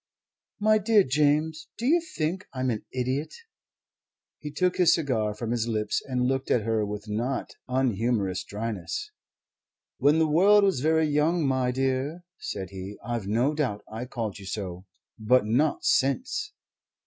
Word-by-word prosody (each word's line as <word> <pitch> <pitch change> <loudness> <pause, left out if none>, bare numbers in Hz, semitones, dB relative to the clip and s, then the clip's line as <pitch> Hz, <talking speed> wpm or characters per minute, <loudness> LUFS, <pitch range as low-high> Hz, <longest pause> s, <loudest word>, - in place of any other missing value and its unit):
"My 215 +1 +4
dear 210 0 +4
James, 150 +3 +1
do 235 - -4
you 335 +6 +4
think 180 - -3
I'm 130 -1 0
an 110 - -4
idiot?" 130 +4 -2 1.1
He 150 - -6
took 180 +4 0
his 180 -2 +5
cigar 115 -10 -1
from 115 +1 -4
his 120 -1 0
lips 105 -2 -1
and 125 -2 0
looked 135 +1 -1
at 115 - +2
her 110 -1 +1
with 105 +1 -5
not 120 +6 -2 0.2
unhumorous 115 -6 0
dryness. 115 - -4 0.9
"When 145 +2 +4
the 160 - +4
world 200 +7 +5
was 195 -9 +2
very 160 +3 +3
young, 155 +2 +2
my 130 -2 +1
dear," 135 +6 -1 0.2
said 95 - -5
he, 95 +1 -7
"I've 120 -4 -3
no 120 +8 +2
doubt 130 -10 -2
I 115 +3 -5
called 115 -5 -4
you 95 - -10
so. 95 -2 -5 0.3
But 115 +1 +3
not 135 +8 +1
since." 260 - +1
130 Hz, 155 wpm, -27 LUFS, 110-160 Hz, 1.1 s, his